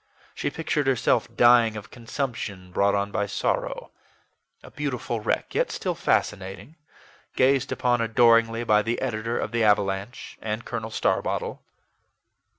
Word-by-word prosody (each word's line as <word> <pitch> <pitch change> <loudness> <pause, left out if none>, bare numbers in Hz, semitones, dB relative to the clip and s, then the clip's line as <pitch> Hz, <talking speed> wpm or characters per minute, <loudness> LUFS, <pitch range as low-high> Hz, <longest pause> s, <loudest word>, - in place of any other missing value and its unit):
She - - -2
pictured 150 -3 -2
herself 125 -3 +2
dying 120 -2 +5
of 105 - -10
consumption, 115 -7 -5
brought 100 +2 +2
on 100 0 -1
by 100 0 -1
sorrow - - -2 0.7
a - - -13
beautiful 125 -5 -3
wreck, 105 - -2
yet - - +1
still - - -2
fascinating, 95 +9 -2 0.6
gazed 130 0 +2
upon 120 -1 +1
adoringly 115 0 +4
by 105 -2 +4
the 115 +3 -2
editor 115 -2 -2
of 105 - -3
the 115 -1 +1
AVALANCHE 100 +1 0
and 110 +1 -4
Colonel 115 -1 -4
Starbottle. - - -1
115 Hz, 135 wpm, -25 LUFS, 105-120 Hz, 0.7 s, dying